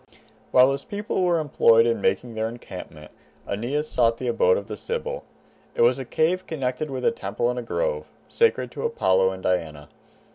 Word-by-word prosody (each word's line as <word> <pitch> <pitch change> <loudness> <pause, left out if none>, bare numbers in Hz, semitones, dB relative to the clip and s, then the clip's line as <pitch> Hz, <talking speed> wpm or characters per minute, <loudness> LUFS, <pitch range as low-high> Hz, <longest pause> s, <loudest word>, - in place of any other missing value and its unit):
While 130 +1 +6
his 140 0 -3
people 205 -1 -3
were 175 -1 +3
employed 115 -6 +4
in 115 -1 0
making 120 -2 0
their 110 0 -2
encampment 90 -9 -10 0.4
Aeneas 130 +9 -2
sought 115 -4 +2
the 130 - -4
abode 95 -6 +3
of 100 - -5
the 105 0 -6
Sibyl. 485 - -4 0.5
It 480 - +3
was 475 - +4
a - - -5
cave 180 +4 0
connected 135 -1 -3
with 130 -2 -4
a - - +4
temple 120 - -2
and 125 -2 -5
grove, - - -1 0.2
sacred 465 -1 +1
to - - -7
Apollo 95 - +2
and 95 0 -7
Diana. 80 -5 -2
125 Hz, 180 wpm, -24 LUFS, 110-175 Hz, 0.5 s, While